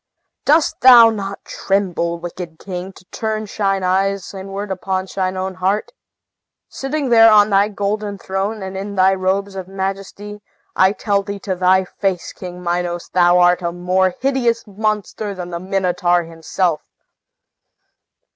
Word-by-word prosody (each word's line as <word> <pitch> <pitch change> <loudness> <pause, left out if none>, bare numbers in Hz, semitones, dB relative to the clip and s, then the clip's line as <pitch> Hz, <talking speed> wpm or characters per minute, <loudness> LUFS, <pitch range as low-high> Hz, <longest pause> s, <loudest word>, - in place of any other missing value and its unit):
Dost 305 +2 +2
thou 240 -3 +9
not 200 -2 -6
tremble, 180 -4 -1
wicked 170 -1 -8
king, 185 +1 -6
to 185 - -18
turn 220 -1 -3
thine 195 -2 -1
eyes 195 +1 0
inward 195 +1 -6
on 190 -1 -1
thine 185 -1 -1
own 190 0 -3
heart? 190 +3 -1 0.8
Sitting 275 0 -3
there 225 -1 +7
on 210 0 +5
thy 200 +1 +4
golden 205 0 -3
throne, 195 +2 -3
and 190 0 -6
in 200 +1 -5
thy 190 0 +4
robes 190 +1 -1
of 190 -1 -6
majesty, 195 +2 -5 0.3
I 190 +1 +4
tell 200 -2 0
thee 200 0 -6
to 195 - -2
thy 185 +1 +3
face, 185 -1 -3
King 180 -1 -9
Minos, 175 0 -2
thou 175 -1 +4
art 180 0 +4
a 170 -1 -2
more 180 +1 0
hideous 255 -4 0
monster 210 0 -3
than 180 -1 -7
the 170 - -4
Minotaur 180 -2 0
himself!" 165 +1 -2
195 Hz, 145 wpm, -19 LUFS, 180-205 Hz, 0.8 s, thou